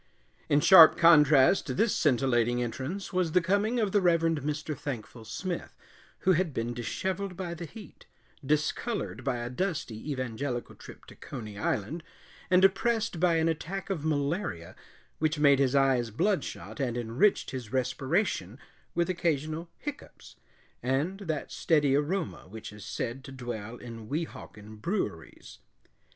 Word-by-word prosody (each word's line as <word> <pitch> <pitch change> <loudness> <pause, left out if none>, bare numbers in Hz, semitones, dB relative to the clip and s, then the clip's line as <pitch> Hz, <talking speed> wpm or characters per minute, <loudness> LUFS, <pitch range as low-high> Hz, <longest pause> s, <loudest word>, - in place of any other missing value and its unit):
In 145 0 +4
sharp 170 -3 +9
contrast 150 -1 +6
to 130 - -2
this 220 - +2
scintillating 120 -4 +2
entrance 135 - -5
was 180 -3 0
the 180 - +6
coming 205 +7 +1
of 210 -3 +1
the 205 - +3
Reverend 165 -3 +2
Mr. 150 +2 -3
Thankful 115 -5 -7
Smith, 180 - -5 0.4
who 190 - +3
had 170 -4 +1
been 115 +1 -2
disheveled 185 - -3
by 180 -2 -4
the 170 0 -6
heat, 215 +5 -13 0.4
discolored 150 - -1
by 135 -3 -1
a 120 0 -4
dusty 150 - -3
evangelical 130 -1 -3
trip - - -13
to - - -14
Coney 105 -3 -8
Island, 105 - -2 0.5
and 185 +1 +6
oppressed 220 0 +1
by 175 -1 +3
an 160 0 +2
attack 185 +5 -3
of 165 -6 -3
malaria 145 - -2 0.4
which 155 0 +1
made 140 -2 +5
his 135 0 +2
eyes 135 -4 +3
bloodshot 185 - -2
and 125 -3 -1
enriched 120 - +1
his 125 -5 -6
respiration 130 - -1 0.4
with 170 0 +2
occasional 165 -2 -1
hiccoughs 295 - -9 0.5
and 140 +10 -1
that 160 -7 -4
steady 145 -4 +2
aroma 160 - -2
which 105 +1 -9
is 105 -1 -11
said 120 +4 -4
to 135 - -10
dwell 120 -4 -6
in 115 -3 -9
Weehawken 110 -9 -6
breweries. 105 - -4
145 Hz, 145 wpm, -29 LUFS, 120-180 Hz, 0.5 s, sharp